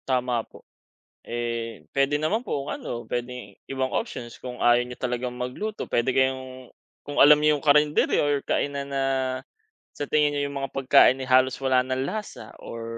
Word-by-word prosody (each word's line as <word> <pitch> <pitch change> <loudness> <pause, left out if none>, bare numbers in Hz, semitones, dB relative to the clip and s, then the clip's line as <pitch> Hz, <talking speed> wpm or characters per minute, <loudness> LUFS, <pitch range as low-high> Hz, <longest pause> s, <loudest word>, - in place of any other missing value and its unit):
Tama 125 -2 +1
po. - - -17 0.6
Eh, 115 -6 -4
pwede 140 +1 +2
naman 215 +10 0
po 140 - -2
kung - - -6
ano, 120 0 -6
pwedeng 120 -4 -5
ibang 130 -1 -2
options 125 - -4
kung 125 -1 -8
ayaw 120 0 +5
niyo 125 0 -9
talagang 125 0 -3
magluto, 125 +14 -5
pwede 120 +2 +1
kayong 130 -1 -1 0.4
kung 145 - -6
alam 150 +1 +9
nyo 150 0 +3
yung 145 - -12
carinderia 150 +1 +4
or 145 -1 +1
kainan 140 -1 -1
na 135 -1 -1 0.9
sa 145 - -4
tingin 150 -1 +3
niyo 145 0 -1
yung 140 - -6
mga 135 - -3
pagkain, 135 -1 +5
eh, 130 - -5
halos 130 0 +4
wala 130 -1 +3
ng 130 +1 -2
lasa 210 +8 -6
or 115 0 -7
130 Hz, 175 wpm, -25 LUFS, 125-145 Hz, 0.9 s, alam